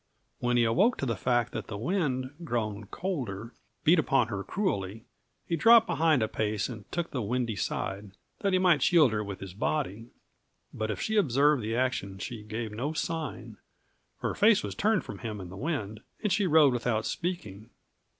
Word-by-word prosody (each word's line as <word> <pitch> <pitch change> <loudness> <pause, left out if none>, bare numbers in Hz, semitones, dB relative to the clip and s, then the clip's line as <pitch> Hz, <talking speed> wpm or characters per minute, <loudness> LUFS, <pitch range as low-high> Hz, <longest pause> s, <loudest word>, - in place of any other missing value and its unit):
When 125 0 +1
he 120 - +4
awoke 185 - +3
to - - -2
the 115 -3 0
fact 120 +4 +1
that - - -4
the 100 - -5
wind, 130 - -1
grown 110 -7 -2
colder, 115 - -4 0.3
beat 165 +2 +5
upon 135 -6 +2
her 100 -3 -3
cruelly, 110 - -2 0.4
he 170 - -1
dropped 225 +6 +7
behind 155 - +2
a - - +1
pace 105 -1 -1
and 110 -4 -9
took 175 -1 -2
the 130 - -2
windy 115 +1 -1
side, 100 +1 -3 0.3
that 200 - 0
he 185 - +4
might 180 -5 +4
shield 160 -8 +5
her 105 -1 -1
with 100 -2 -6
his 95 -2 -7
body. 115 -1 -2 0.7
But 110 0 -3
if 110 - -3
she 220 0 -1
observed 145 - +3
the 110 +1 -2
action 120 -6 -1
she 110 +3 -6
gave 110 +1 -5
no 130 +9 -3
sign; 160 -1 -4 0.6
her - - -1
face 210 -1 +4
was - - -4
turned 215 -2 +1
from - - -8
him 110 -4 -5
and 90 -2 -8
the - - -8
wind, 110 - -3 0.2
and 210 -4 +2
she 200 0 +2
rode 150 -5 +6
without 115 -2 0
speaking. 165 - -4
120 Hz, 190 wpm, -29 LUFS, 105-165 Hz, 0.7 s, dropped